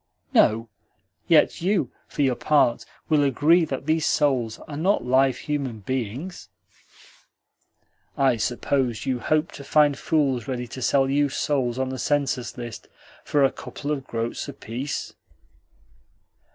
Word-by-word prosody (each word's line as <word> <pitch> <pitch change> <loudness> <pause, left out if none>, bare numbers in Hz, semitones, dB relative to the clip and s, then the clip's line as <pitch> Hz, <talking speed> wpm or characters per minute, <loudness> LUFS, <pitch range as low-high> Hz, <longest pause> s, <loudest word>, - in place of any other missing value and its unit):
"No; 115 +2 +4 0.6
yet 165 -2 +4
you, 175 - +1 0.2
for 145 - -1
your 130 -2 +3
part, 125 -2 +2 0.2
will 155 -2 +3
agree 155 +5 +4
that 135 -2 -5
these 160 +1 +1
souls 125 -6 +1
are 145 - -7
not 180 +1 +1
live 130 0 +3
human 135 -7 -3
beings?" 130 - -4 1.7
"I 135 -3 +3
suppose 125 +1 -1
you 130 -2 -1
hope 155 +5 0
to 140 - -10
find 145 0 +4
fools 135 -6 0
ready 125 -2 -3
to 130 - -8
sell 135 +2 +3
you 145 +1 +2
souls 130 -4 -1
on 130 0 -1
the 130 -1 -5
census 140 -5 -1
list 120 -2 -7 0.4
for 145 -1 +2
a 135 - +4
couple 145 +1 -6
of 135 -3 -3
groats 115 0 -3
apiece?" 125 +6 -5
135 Hz, 140 wpm, -24 LUFS, 125-150 Hz, 1.7 s, No